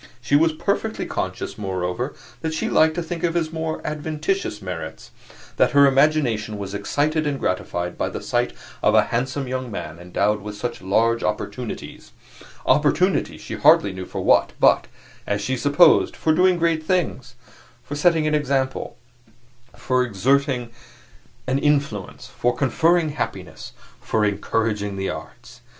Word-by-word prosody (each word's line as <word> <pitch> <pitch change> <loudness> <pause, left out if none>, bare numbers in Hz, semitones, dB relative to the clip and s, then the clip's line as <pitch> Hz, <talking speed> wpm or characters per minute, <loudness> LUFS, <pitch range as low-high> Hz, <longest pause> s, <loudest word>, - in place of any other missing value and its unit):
She 120 +4 0
was 160 +2 +4
perfectly 155 - -2
conscious, - - -4
moreover, 95 +6 -3 0.3
that 160 -1 -2
she - - -1
liked 160 0 +4
to 175 - -2
think 170 0 -5
of 170 -1 0
his 165 -2 -1
more 160 0 -3
adventitious 155 - -2
merits; 90 -4 -7 0.5
that - - +3
her 140 0 +7
imagination 135 -7 +2
was 100 -1 -6
excited 150 +9 0
and 140 -2 -2
gratified 90 -1 -2
by - - 0
the - - -5
sight - - -1 0.3
of 105 - +3
a 110 - +6
handsome 130 +4 -2
young 130 0 -3
man 85 -6 -6
endowed 100 +4 0
with 105 0 -7
such 120 0 -4
large 115 +5 +2
opportunities 115 +3 -5 0.5
opportunities 150 +7 +2
she - - -7
hardly 100 -1 +4
knew 95 -1 -7
for - - -5
what, - - +3
but, - - +4 0.4
as 100 - 0
she 115 +6 -1
supposed, 145 +6 +4
for 160 - +1
doing 180 +2 +4
great 165 -2 +1
things 155 -7 -1 0.5
for - - -7
setting 160 +1 +3
an 155 - +1
example, 135 -3 -1 0.8
for 125 +1 0
exerting 125 +2 +1 0.7
an 130 +2 0
influence, 140 -9 -1
for 120 0 -1
conferring 160 +5 +2
happiness, 145 - -5 0.3
for 110 -1 0
encouraging 105 0 -1
the 95 0 -2
arts. - - -10
130 Hz, 150 wpm, -22 LUFS, 105-155 Hz, 0.8 s, her